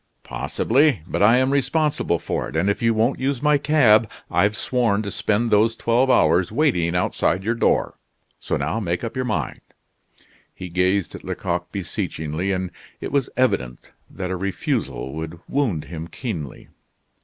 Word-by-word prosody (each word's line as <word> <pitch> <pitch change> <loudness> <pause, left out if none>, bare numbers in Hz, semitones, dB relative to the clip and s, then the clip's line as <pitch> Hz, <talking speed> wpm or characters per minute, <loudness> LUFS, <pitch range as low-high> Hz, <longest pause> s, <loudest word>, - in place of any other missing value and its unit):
"Possibly, 110 - +1
but - - -3
I 110 +4 +6
am 130 +1 +2
responsible 140 - +1
for - - -3
it, 60 - -10
and 90 +6 +2
if - - -4
you 115 0 +3
won't 115 +4 +1
use 135 0 -1
my 150 -1 +4
cab, 120 -8 +4 0.2
I've 100 +5 +2
sworn 115 -5 +1
to 100 - -4
spend 110 +2 0
those 110 +2 +4
twelve 120 +3 +2
hours 85 -4 +3
waiting 110 - +1
outside 90 +1 +1
your 115 +3 +1
door. 115 - +1 0.4
So - - -2
now 80 +10 -1
make 90 -2 -2
up 115 - -4
your 130 0 -1
mind." 75 - -2 0.9
He 90 -1 -7
gazed 90 +2 +1
at - - -9
Lecoq - - -3
beseechingly, 80 +5 -3
and 95 -1 -2 0.3
it - - -5
was 140 -2 +1
evident 60 - 0 0.2
that 90 -1 -5
a - - -1
refusal 90 -7 -2
would 80 +2 -6
wound 120 - 0
him 80 -1 -7
keenly. 85 - -6
100 Hz, 165 wpm, -22 LUFS, 85-125 Hz, 0.9 s, I